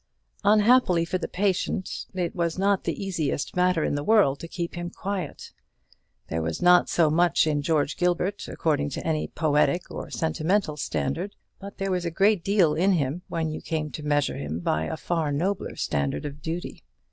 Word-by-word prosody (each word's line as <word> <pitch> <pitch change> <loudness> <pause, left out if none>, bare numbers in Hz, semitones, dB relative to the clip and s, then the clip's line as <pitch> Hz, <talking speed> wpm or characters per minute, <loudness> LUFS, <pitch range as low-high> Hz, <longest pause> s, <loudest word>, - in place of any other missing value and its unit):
Unhappily 210 -4 +4
for 185 +2 -2
the - - -3
patient, 190 -1 -1
it 180 -2 -2
was 170 -1 -1
not 195 0 +1
the 195 - -2
easiest 160 -6 -2
matter 180 -3 +2
in - - 0
the 145 0 -2
world 195 -9 +4
to 165 - -7
keep 170 0 -4
him 175 0 -4
quiet. 190 -4 -5 0.8
There 80 - -2
was 80 0 -3
not 180 0 +5
so 160 -3 +3
much 170 +1 +3
in 150 -2 +1
George 150 -1 0
Gilbert, 180 +3 0
according 145 -3 0
to - - -6
any 155 -2 0
poetic 150 +2 +1
or - - -6
sentimental 160 +1 0
standard; 160 +6 -3 0.2
but 200 0 -9
there 195 -1 -2
was 180 -1 0
a - - 0
great 195 +2 +2
deal 195 -6 +3
in 185 +5 +3
him, 150 0 -1
when 160 -2 -2
you 155 - -5
came 155 -2 -3
to 130 - -6
measure 145 -1 0
him 75 +3 -4
by 80 -1 0
the - - -4
far 160 -3 -1
nobler 180 +7 -1
standard 70 - -1
of 145 0 -7
duty. 165 +3 -5
170 Hz, 185 wpm, -26 LUFS, 150-185 Hz, 0.8 s, not